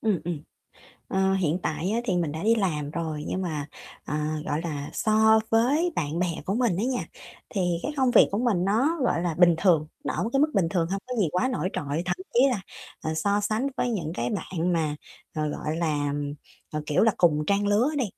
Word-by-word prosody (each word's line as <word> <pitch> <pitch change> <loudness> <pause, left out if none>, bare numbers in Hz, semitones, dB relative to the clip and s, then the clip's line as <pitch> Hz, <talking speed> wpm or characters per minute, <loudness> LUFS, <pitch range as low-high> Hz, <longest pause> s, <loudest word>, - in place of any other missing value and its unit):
Ừm, 210 -7 +1
ừm. 165 -3 -3 0.7
Ờ, 190 0 +2
hiện 175 -3 +1
tại 165 +4 -1
á 225 +2 +1
thì 190 -7 0
mình 165 -4 0
đã 160 - -5
đi 225 +2 +4
làm 155 -9 -1
rồi, 155 -2 -4
nhưng 190 - -2
mà, 155 -5 -3 0.4
ờ, 150 - -4 0.3
gọi 150 - -1
là, 145 -3 -4
so 220 0 +4
với 280 +10 +3
bạn 155 +1 -1
bè 180 - +2 0.2
của 195 - -1
mình 230 -6 +1
á 205 - 0
nha, 255 -1 -1 0.4
thì 175 -4 0
cái 295 - -2
công 260 -2 +3
việc - - +6
của 200 - -1
mình 220 -7 +1
nó, 245 - +2
gọi 170 -8 +1
là, 175 -2 -1
bình 175 -1 +6
thường, 165 -5 +3 0.2
nó - - -2
ở - - -1
một 225 - -2
cái 275 - +3
mức 305 +1 +3
bình 190 -5 +2
thường, 170 -2 +1
hông 195 +1 -1
có 250 - -4
gì 200 -7 +2
quá 205 +9 +1
nổi 245 -8 -1
trội. 145 +3 -2
Thậm 180 0 -1 0.2
chí 240 - +5
là, 235 -6 -1 0.4
ờ, 155 - -2
so 200 +6 +1
sánh 215 +5 0
với 245 - 0
những 170 -8 -2
cái 120 -4 -2
bạn 180 -1 -2
mà, 155 -3 0 0.4
ờ, 155 -1 -1
gọi 150 +1 -3
là, 150 -4 0 0.6
ờ, 150 0 -2
kiểu 150 - +2
là, 225 0 +5
cùng 150 -3 +3
trang 200 0 +2
lứa 210 +7 +3
đi, 260 - +2
180 Hz, 230 wpm, -26 LUFS, 160-220 Hz, 0.7 s, việc